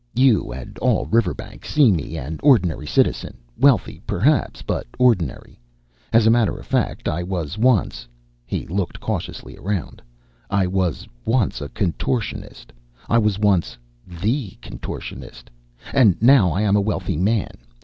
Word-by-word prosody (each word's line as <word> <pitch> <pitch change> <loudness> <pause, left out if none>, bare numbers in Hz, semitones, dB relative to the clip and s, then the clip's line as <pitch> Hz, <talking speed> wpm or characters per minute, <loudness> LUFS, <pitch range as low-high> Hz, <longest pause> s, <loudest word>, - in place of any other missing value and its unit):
You 125 - +3
and 65 0 -9
all - - +1
Riverbank 95 - -1
see 145 -5 +4
in 95 - +3
me 80 +1 -4
an 75 +3 -6
ordinary 95 - +3
citizen, - - 0 0.2
wealthy, 135 -3 +2
perhaps, 140 - +1
but - - -3
ordinary. 105 - +1 0.5
As 115 -1 +4
a 110 - +6
matter 115 -3 +2
of - - -11
fact, - - -1
I 85 - -1
was 90 -2 -3
once" 110 - +1 0.4
he - - -4
looked 95 +1 -3
cautiously - - -5
around 95 -3 -4 0.5
"I 100 -1 +2
was 90 -2 -1 0.2
once 115 - 0
a 70 - -5
contortionist. 95 - -3 0.4
I 115 - +4
was 105 -3 +1
once 100 -4 +1 0.3
the 100 - -2
contortionist. - - -8 0.4
And 115 -10 +4
now 120 -5 +6
I 95 +6 0
am 100 -1 +3
a 105 - +3
wealthy 95 -6 -2
man. 100 +4 +1
100 Hz, 145 wpm, -21 LUFS, 85-115 Hz, 0.5 s, a